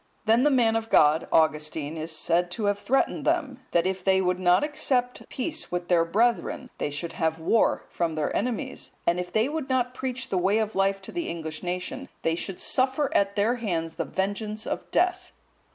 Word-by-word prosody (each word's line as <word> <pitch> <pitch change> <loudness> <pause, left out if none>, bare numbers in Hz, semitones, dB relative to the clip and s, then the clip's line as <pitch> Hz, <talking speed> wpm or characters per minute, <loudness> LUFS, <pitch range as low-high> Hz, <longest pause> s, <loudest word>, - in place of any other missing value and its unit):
Then 225 +2 +4
the 295 - +4
man 240 -5 +3
of 225 0 -2
God, 155 +2 +4
Augustine, 155 -1 +1
is 160 +1 -4
said 170 +2 0
to 210 +4 -3
have 205 0 +1
threatened 270 +6 +1
them, 295 -6 0
that 170 0 +2
if 190 0 -2
they 190 0 +4
would 180 -1 0
not 180 +5 +4
accept 255 -4 0
peace 310 +5 -3
with 175 0 -3
their 170 -2 +4
brethren, 235 +7 0
they - - -1
should 145 +4 -4
have 160 -1 0
war 170 +8 +2
from 165 -2 -2
their 155 -1 -1
enemies; 235 0 -2 0.2
and, 175 +1 +2
if 180 0 -4
they 220 +3 +2
would 300 -2 -4
not 250 -1 +1
preach 260 -1 -4
the 185 - +1
way 195 +4 +2
of 220 -1 -1
life 195 0 +1
to - - -8
the 345 -1 -3
English 160 -2 -5
nation, 180 +9 -4
they 165 - +2
should 180 +2 -4
suffer 265 +2 +1
at 200 0 +2
their 220 +4 +2
hands 165 -8 -2
the - - -3
vengeance 210 +3 -3
of - - -4
death. 360 +1 0
200 Hz, 200 wpm, -26 LUFS, 170-250 Hz, 0.2 s, Then